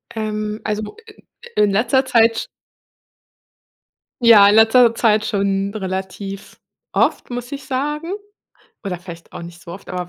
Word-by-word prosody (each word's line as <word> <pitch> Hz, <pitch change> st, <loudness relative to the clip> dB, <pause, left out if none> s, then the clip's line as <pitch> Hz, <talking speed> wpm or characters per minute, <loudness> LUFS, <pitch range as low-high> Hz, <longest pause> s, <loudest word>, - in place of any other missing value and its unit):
Ähm, 215 Hz, 0 st, -3 dB
also 215 Hz, 0 st, -2 dB
wo -, -, -11 dB
i -, -, -12 dB, 0.4 s
in -, -, +4 dB
in 200 Hz, -, 0 dB
letzter 260 Hz, +6 st, +2 dB
Zeit, 230 Hz, -2 st, +3 dB
sch -, -, -3 dB, 1.8 s
ja 215 Hz, -4 st, +8 dB
in 205 Hz, -, +4 dB
letzter 230 Hz, +1 st, +6 dB
Zeit 215 Hz, -2 st, +2 dB
schon 200 Hz, -1 st, -1 dB
relativ 195 Hz, 0 st, -6 dB, 0.3 s
oft, -, -, 0 dB
muss 245 Hz, +1 st, -6 dB
ich 280 Hz, -, -7 dB
sagen, 295 Hz, +5 st, -3 dB, 0.7 s
oder 185 Hz, -4 st, -4 dB
vielleicht 170 Hz, -2 st, -12 dB
auch -, -, -7 dB
nicht 170 Hz, 0 st, -11 dB
so 170 Hz, -, -12 dB
oft, 195 Hz, +3 st, -11 dB
aber 180 Hz, -1 st, -4 dB
215 Hz, 155 wpm, -19 LUFS, 195-230 Hz, 1.8 s, ja